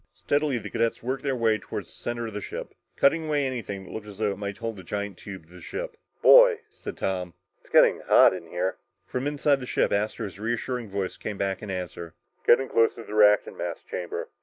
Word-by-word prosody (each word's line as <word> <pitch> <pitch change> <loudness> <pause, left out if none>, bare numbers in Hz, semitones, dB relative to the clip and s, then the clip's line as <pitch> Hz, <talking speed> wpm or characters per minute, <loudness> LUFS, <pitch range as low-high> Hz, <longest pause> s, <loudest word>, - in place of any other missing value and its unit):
Steadily, 145 -2 0
the 105 -2 -7
cadets 115 0 0
worked 130 +2 -2
their 135 -2 -1
way 115 -2 +3
up 110 - -3
toward - - -5
the - - -13
center 120 0 -4
of 110 - -6
the 105 - -4
ship, - - -6 0.2
cutting 155 +2 +2
anything 125 -9 -2
that - - -12
looked 110 -1 -7
as 100 -2 -10
though 105 -2 +1
it 100 - -5
might 100 -1 -4
hold 115 -1 -4
the 95 - -9
giant 100 +2 -4
tube 95 -2 -9
to 85 - -20
the 90 - -12
ship. - - -5 0.3
"Boy," - - +8
said - - -8
Tom, 90 -3 -2 0.2
"it's - - -24
getting - - +5
hot - - +7
in 90 -3 -7
here!" 90 +3 -2 0.3
From 125 +7 -3
inside 145 -1 +2
the 125 - -7
ship, - - +1
Astro's 100 -2 -2
reassuring 120 +1 -2
voice 95 -1 -3
came 105 - -5
back 95 -1 -2
in 105 - -7
answer. 90 -3 -5 0.3
"You're - - +9
getting 135 +2 -4
close 115 0 +3
to 115 - -8
the 105 - -9
reactant 105 -1 +4
mass - - -3
chamber. 90 -1 -5
110 Hz, 230 wpm, -26 LUFS, 95-130 Hz, 0.3 s, You're